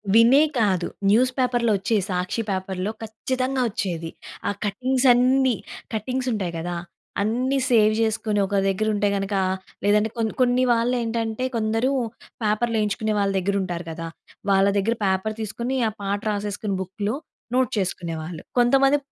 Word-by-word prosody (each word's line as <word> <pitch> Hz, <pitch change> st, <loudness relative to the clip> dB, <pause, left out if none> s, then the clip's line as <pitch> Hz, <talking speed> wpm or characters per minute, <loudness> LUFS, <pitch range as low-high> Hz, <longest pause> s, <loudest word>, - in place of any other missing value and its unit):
వినే 235 Hz, +5 st, +7 dB, 0.2 s
కాదు 190 Hz, -5 st, +2 dB, 0.2 s
న్యూస్ 250 Hz, +5 st, +4 dB
పేపర్‌లో 240 Hz, -3 st, +2 dB
వచ్చేయి. 205 Hz, +2 st, +1 dB
సాక్షి 180 Hz, +5 st, -1 dB
పేపర్‌లో 190 Hz, +1 st, -2 dB
ఖచ్చితంగా 255 Hz, +4 st, -2 dB
వచ్చేది. 170 Hz, -5 st, -3 dB, 0.4 s
ఆ -, -, +2 dB
కటింగ్స్ 255 Hz, +6 st, +1 dB
అన్నీ 255 Hz, 0 st, +3 dB, 0.4 s
కటింగ్స్ 255 Hz, +3 st, -2 dB
ఉంటాయి 185 Hz, -5 st, -2 dB
గదా! 175 Hz, +1 st, -3 dB, 0.4 s
అన్నీ 250 Hz, +6 st, +1 dB
సేవ్ 215 Hz, -3 st, +5 dB
జేసుకొని 220 Hz, -1 st, +1 dB
ఒక 200 Hz, -, -2 dB
దగ్గర 195 Hz, +3 st, 0 dB
ఉంటే 205 Hz, 0 st, +2 dB
గనక, 195 Hz, +1 st, -2 dB, 0.5 s
లేదంటే 210 Hz, +2 st, +3 dB
కొన్ని, 220 Hz, -1 st, 0 dB
కొన్ని 250 Hz, 0 st, +3 dB
వాళ్ళేంటంటే, 230 Hz, 0 st, 0 dB
కొందరు 225 Hz, +3 st, +1 dB, 0.5 s
పేపర్‌లు 220 Hz, +2 st, +1 dB
యేయించుకునే 215 Hz, +1 st, 0 dB
వాళ్ళ 200 Hz, -1 st, +2 dB
దగ్గర 200 Hz, +2 st, -1 dB
ఉంటారు 175 Hz, -2 st, -4 dB
కదా! 165 Hz, +1 st, -5 dB, 0.4 s
వాళ్ళ 195 Hz, 0 st, +5 dB
దగ్గర 225 Hz, +4 st, +1 dB
పేపర్ 190 Hz, +3 st, 0 dB
తీసుకొని, 235 Hz, +5 st, -2 dB
ఆ -, -, -7 dB
పాట 200 Hz, +1 st, -1 dB
రాసేసుకుని 205 Hz, 0 st, -2 dB
బుక్‌లో 200 Hz, +5 st, -3 dB, 0.4 s
నోట్ 260 Hz, 0 st, +2 dB
చేసుకునేవాళ్ళు. 165 Hz, -3 st, -4 dB, 0.2 s
కొంతమంది 270 Hz, +3 st, +5 dB
215 Hz, 140 wpm, -24 LUFS, 195-240 Hz, 0.5 s, వినే